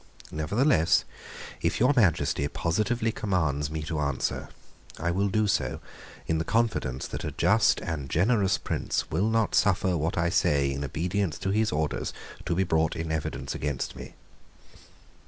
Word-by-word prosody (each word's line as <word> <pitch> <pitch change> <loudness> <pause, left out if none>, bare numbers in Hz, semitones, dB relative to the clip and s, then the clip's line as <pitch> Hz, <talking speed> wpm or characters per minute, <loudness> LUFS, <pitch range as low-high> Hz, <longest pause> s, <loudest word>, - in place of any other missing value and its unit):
Nevertheless, 90 - +2 0.6
if - - 0
your 125 +5 +4
Majesty 90 - +2
positively 110 +10 0
commands 80 -10 -1
me 80 0 -4
to 80 0 -3
answer, 70 -4 -2 0.5
I 85 +2 -1
will 100 +3 +1
do 110 +2 +2
so 100 - 0 0.5
in 80 0 0
the - - 0
confidence 110 - 0
that - - -5
a - - -4
just - - +3
and 75 -5 -4
generous 95 - +2
prince - - -2
will 105 +4 +1
not 115 -1 +1
suffer 95 -2 +3
what 80 +2 -1
I 85 0 +2
say 70 -4 +2
in 70 +1 -3
obedience 90 +5 -1
to 95 - -2
his 110 +2 +1
orders 75 0 -2 0.3
to 85 - +1
be 95 - +2
brought 80 -3 +1
in 80 0 -3
evidence 80 -1 -3
against 70 -3 -3
me." - - -10
85 Hz, 155 wpm, -27 LUFS, 75-100 Hz, 0.6 s, your